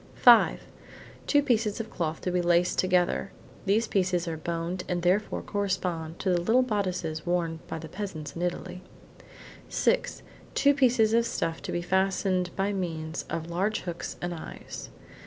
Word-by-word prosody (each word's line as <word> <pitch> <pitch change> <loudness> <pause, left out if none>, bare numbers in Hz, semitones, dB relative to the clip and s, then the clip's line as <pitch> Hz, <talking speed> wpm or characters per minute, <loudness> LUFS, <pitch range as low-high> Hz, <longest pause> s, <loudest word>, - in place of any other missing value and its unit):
Five: 240 -2 +6 0.7
two 290 -1 +4
pieces 230 -6 +1
of 225 -1 -5
cloth 160 -3 -2
to 180 - -1
be 180 0 +1
laced 175 0 +2
together. 185 +1 +2 0.4
(These 220 +4 +3
pieces 180 -4 +1
are 165 - -2
boned 170 +3 -3
and 175 -1 -1
therefore 190 +4 +1
correspond 180 -5 -2
to 190 - +1
the 175 -1 +2
little 235 +8 +4
bodices 185 -8 -2
worn 170 -2 -1
by - - -4
the 160 0 -7
peasants 160 -5 -6
in 170 - -5
Italy.) 180 +1 -3 0.9
Six: - - 0 0.3
two 285 0 +5
pieces 245 -5 +3
of 230 0 +3
stuff 165 -7 -2
to - - -5
be 175 - -2
fastened 190 0 +1
by 195 +1 0
means 160 -4 -3
of 165 0 -4
large 195 +5 0
hooks 175 -1 -5
and 175 0 -2
eyes. 160 - -8
180 Hz, 160 wpm, -28 LUFS, 170-205 Hz, 0.9 s, Five